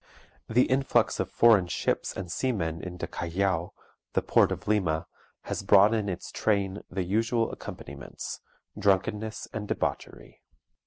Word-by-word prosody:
The 125 +3 +4
influx 135 +1 +2
of - - -1
foreign 110 -6 +5
ships 85 - -1
and 90 -3 -5
seamen 85 -10 -1
into 90 -1 -5
Callao, 90 0 -1 0.4
the - - +1
port - - +4
of - - -5
Lima, 85 -6 +1 0.4
has - - -4
brought 100 +2 +6
in 105 -3 0
its 90 - -5
train 100 -2 0
the 95 +1 -2
usual 115 +5 +1
accompaniments, 70 0 -8 0.4
drunkenness 105 +3 0
and 105 -1 -4
debauchery. - - -4
100 Hz, 135 wpm, -28 LUFS, 90-110 Hz, 0.4 s, brought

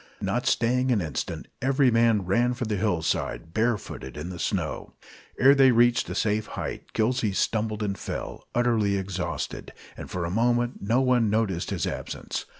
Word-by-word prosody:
Not - - -1
staying 125 +2 +2
an 115 - +3
instant, 80 -7 -4
every 135 0 +3
man 115 -3 +3
ran 120 +7 +2
for 120 - -3
the 110 -1 -1
hillside, 80 - -1
barefooted 110 - -2
in 80 +5 -5
the 90 - -8
snow. - - -2 0.4
Ere 135 +2 +7
they 135 -1 +6
reached 120 0 +3
a - - -4
safe 110 0 0
height, - - -6
Gillsey 115 -2 +1
stumbled 110 +1 0
and 100 -1 -1
fell, - - -6
utterly 115 -5 +2
exhausted, 95 -1 -4 0.2
and - - -8
for 90 -1 -3
a 85 - -3
moment 120 +3 +1
no 115 +6 +2
one 125 -4 +3
noticed 100 -5 0
his - - -1
absence. - - -5
110 Hz, 165 wpm, -26 LUFS, 95-120 Hz, 0.4 s, Ere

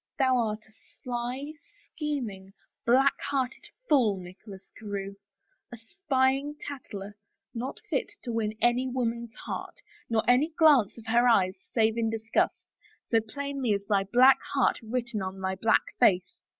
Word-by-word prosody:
" - - -63
Thou 260 -2 +3
art 215 -3 -1
a - - -22 0.3
sly, 250 +4 -4 0.4
scheming, 235 -12 -4 0.3
black 265 +3 +5
hearted 265 -2 -2 0.2
fool, 235 -9 +3
Nicholas 190 +2 -12
Carewe, 200 -2 -5 0.5
a 240 - -8
spying 270 - 0
tattler, 205 -7 -8 0.4
not 245 +3 -5
fit 410 - -1
to 240 - -4
win 215 -1 -2
any 245 +2 +3
woman's 235 -2 -3
heart, - - -6 0.3
nor 225 -2 0
any 270 +7 +3
glance 290 - +5
of 230 - -12
her 235 +2 +3
eyes 190 -6 +4 0.2
save 225 0 +2
in 225 -1 +1
disgust, 225 0 -1 0.4
so 225 - +4
plainly 275 0 -2
is 200 0 -3
thy 200 -2 +2
black 250 +6 +6 0.2
heart 270 - +2
written 235 -1 -3
on 190 0 -5
thy 190 0 -1
black 220 +4 +2 0.2
face. 185 -1 +2
235 Hz, 150 wpm, -28 LUFS, 210-260 Hz, 0.5 s, black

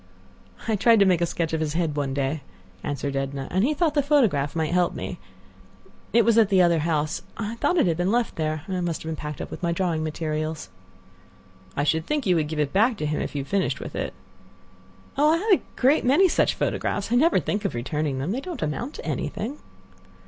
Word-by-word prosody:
"I 220 - +2
tried 225 +2 +5
to - - +7
make 180 -3 +3
a 170 - +2
sketch 165 -1 -2
of 160 - +1
his 155 -2 -1
head 165 -3 0
one 140 -2 -1
day," 140 +2 -1 0.4
answered 140 -1 -3
Edna, 135 0 -3
"and 190 +2 +2
he 300 +5 +2
thought 320 -1 +1
the 295 - +3
photograph 225 - +2
might 160 0 0
help 180 -1 +2
me. - - -5 0.9
It 235 -1 +4
was 230 0 +5
at 215 -3 +4
the 195 -2 +4
other 170 -2 +4
house. 155 0 -1 0.2
I 220 0 -3
thought 355 - +1
it - - +4
had 165 -3 +1
been 180 +3 +1
left 240 0 0
there. 155 -1 -2
I 185 -2 -2
must 170 -2 -2
have 160 0 -3
packed 150 -1 -6
it - - -2
up - - -9
with - - -7
my 170 -1 0
drawing 170 -2 0
materials." 155 0 -3 1.1
"I 140 - +2
should 160 +2 0
think 300 -4 -1
you 185 -3 +3
would 155 -2 +1
give 155 0 -5
it 145 -2 0
back 220 +4 +3
to 155 - -3
him 150 0 -1
if - - -5
you 140 - -1
have - - -14
finished 195 -1 0
with - - -7
it." - - -3 1.0
"Oh! 300 +2 +5
I - - +3
have 420 +5 -1
a 375 - +5 0.2
great 270 +4 +4
many 290 +10 +5
such - - +2
photographs. 200 +2 -2
I - - +3
never 320 +7 +4
think 205 - -2
of - - -2
returning 145 +3 -2
them. 140 +7 -2
They 255 +5 -2
don't 350 - -5
amount 195 - -3
to - - -8
anything." 260 +8 -3
170 Hz, 235 wpm, -25 LUFS, 150-230 Hz, 1.1 s, to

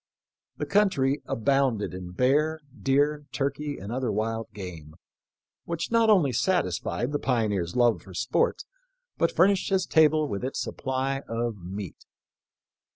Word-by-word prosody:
The - - -2
country 155 -9 +2
abounded 130 -4 +1
in 90 -1 -7
bear, 150 - +2 0.2
deer, 145 +2 +1
turkey, 145 +1 -2
and 100 +3 -7
other 125 -2 -1
wild 110 +2 -2
game, 85 -6 -9 0.7
which 170 +3 -3
not 230 -1 +4
only 180 -11 +5
satisfied 120 - 0
the 145 - -1
pioneer's 105 -9 0
love 120 -2 +3
for 95 -2 -13
sport, 120 +5 0 0.6
but 165 - +3
furnished 190 +3 +3
his 190 -2 +2
table 155 -1 +4
with 100 -4 -4
its 130 - -3
supply 135 +1 -2
of 115 -1 -2
meat. 95 0 -7
130 Hz, 135 wpm, -27 LUFS, 105-150 Hz, 0.7 s, only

